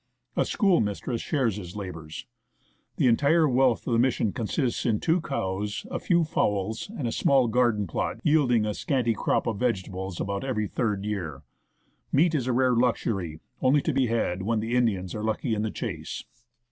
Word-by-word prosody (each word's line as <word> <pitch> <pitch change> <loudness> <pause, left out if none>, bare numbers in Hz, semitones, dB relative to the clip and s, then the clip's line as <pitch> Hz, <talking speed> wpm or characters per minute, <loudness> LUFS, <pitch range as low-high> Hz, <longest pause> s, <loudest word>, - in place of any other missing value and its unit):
A - - +2
schoolmistress 120 - +1
shares 125 - 0
his 90 -2 -8
labours. 85 -6 -7 0.7
The - - +1
entire 145 +7 +4
wealth 130 -2 +2
of 120 - -1
the 115 - +3
Mission 120 -4 +1
consists 120 +2 -1
in 110 -4 +1
two 165 +2 +1
cows, 105 - -3
a - - -2
few 175 -2 +2
fowls, 105 - -1
and 130 - -2
a - - -1
small 135 -1 +3
garden 115 -3 +2
plot 80 - -3
yielding 130 -8 +3
a 105 - -1
scanty 125 -1 0
crop - - 0
of 110 -4 -2
vegetables 95 -6 -2
about 100 +2 -2
every 120 -6 -1
third 105 -2 -1
year. 85 -9 -4 0.7
Meat 165 +4 +3
is 130 -5 0
a - - +2
rare 130 +1 +3
luxury, 105 -9 0 0.2
only 135 +2 +3
to 160 - 0
be 130 -1 +2
had 110 -6 0
when 110 +3 0
the 115 +3 -2
Indians 100 -7 +1
are 105 - -4
lucky 110 +2 -1
in 105 - 0
the 110 - -1
chase. 85 -9 -5
115 Hz, 180 wpm, -26 LUFS, 100-130 Hz, 0.7 s, entire